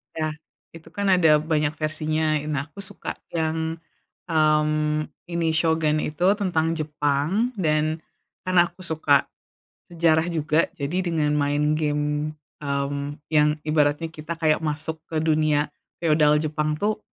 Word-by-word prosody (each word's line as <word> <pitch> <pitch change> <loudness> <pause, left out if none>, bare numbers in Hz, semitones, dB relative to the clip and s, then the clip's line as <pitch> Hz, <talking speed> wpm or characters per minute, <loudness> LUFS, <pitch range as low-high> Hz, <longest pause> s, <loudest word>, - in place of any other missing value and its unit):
Ya 155 -1 -2 0.4
itu 165 - -13
kan 200 0 -2
ada 165 -4 +6
banyak 155 -1 0
versinya. 155 0 0
Nah 145 -1 -2
aku 200 - -13
suka - - -6 0.2
yang, 160 0 -1 0.6
mmm, 155 -1 +2 0.2
ini 170 -1 0
Shogun 160 -1 +2
itu 155 +4 -1
tentang 165 -4 +1
Jepang 155 - 0
dan 155 -1 +1 0.4
karena 180 -1 +4
aku 185 - -15
suka 155 -4 +2 0.6
sejarah 165 -1 +2
juga. 155 0 +1
Jadi 165 +6 -2
dengan 155 -3 +1
main 145 +1 +1
game, 150 0 -1 0.3
mmm, 140 +1 -2
yang 150 0 +4
ibaratnya 150 +1 +2
kita 160 +1 -6
kayak 155 -2 +3
masuk 155 +1 -3
ke 160 -1 -1
dunia 155 -2 +2 0.4
feodal 150 -2 +4
Jepang 155 0 -1
tuh, 215 +1 0
155 Hz, 130 wpm, -24 LUFS, 150-160 Hz, 0.6 s, ada